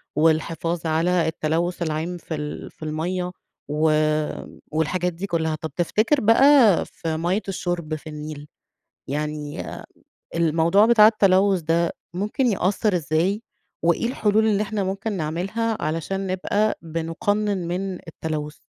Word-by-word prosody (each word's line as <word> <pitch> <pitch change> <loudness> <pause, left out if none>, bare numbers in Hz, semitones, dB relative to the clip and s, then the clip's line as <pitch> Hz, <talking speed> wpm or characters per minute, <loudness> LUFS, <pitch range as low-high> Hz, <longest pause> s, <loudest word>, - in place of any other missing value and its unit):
والحفاظ 165 +2 +1
على 165 +2 +2
التلوث 165 +3 -1
العام 165 +2 -2
في 165 -1 -6
ال 150 0 -6
في - - -13
المَيَّة 180 +4 -2 0.4
و 150 +2 +1 0.8
والحاجات 170 +3 0
دي 180 +4 -5
كلها، 160 -3 0
طب 155 0 -6
تفتكر 215 - +2
بقى 230 -2 +6
في 160 -1 -4
مَيَّة 175 +6 0
الشرب 175 -4 -2
في 155 - -10
النيل، 150 -1 -7 0.6
يعني 150 +1 -3 0.7
الموضوع 170 +5 +4
بتاع 225 -3 +7
التلوث 195 -3 +4
ده 165 +1 +1 0.2
ممكن 210 +8 0
يأثر 200 -1 +1
إزاي، 175 +7 0 0.4
وإيه 170 +7 +2
الحلول 220 -3 +2
اللي 210 -1 +2
إحنا 210 -1 -2
ممكن 195 +3 -3
نعملها، 195 +7 -2
علشان 165 +5 -2
نبقى 200 +3 0
بنُقنن 170 +4 -1
من 190 +2 -2
التلوث؟ 155 -2 -4
175 Hz, 125 wpm, -23 LUFS, 160-200 Hz, 0.8 s, بتاع